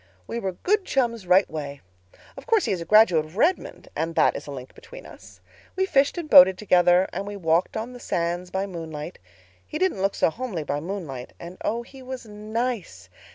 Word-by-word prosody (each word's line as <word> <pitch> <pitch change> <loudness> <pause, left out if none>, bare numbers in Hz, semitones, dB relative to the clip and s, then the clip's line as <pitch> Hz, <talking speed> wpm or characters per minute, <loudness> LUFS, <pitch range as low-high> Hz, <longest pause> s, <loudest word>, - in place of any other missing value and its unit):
"We 235 - -4
were 190 -4 -3
good 405 - 0
chums 235 - -1
right 185 +2 +5
way. 145 -3 -6 0.5
Of - - -12
course 450 -4 +3
he - - -1
is 185 -3 -1
a - - -5
graduate 210 -7 +5
of 155 +5 -13
Redmond, 340 +10 0
and 165 0 -2
that - - +3
is - - -7
a - - -6
link 130 -2 -9
between - - -13
us. - - -15 0.3
We 380 0 +1
fished 280 -3 +2
and 340 -3 -4
boated 185 -7 +8
together; 180 -2 +4
and 200 - -4
we 205 - -5
walked 170 +1 +1
on 230 +3 -5
the 245 - -10
sands 175 -2 -2
by 190 +2 -2
moonlight. 165 -3 -7 0.4
He 305 - -6
didn't 370 - 0
look 195 +1 0
so - - +2
homely 220 -7 -4
by 145 0 -2
moonlight 155 -7 -6
and 175 +2 -10
oh, 230 +2 -1
he 265 +2 -14
was 255 -1 -7
nice. 215 +1 -4
195 Hz, 205 wpm, -24 LUFS, 170-245 Hz, 0.5 s, boated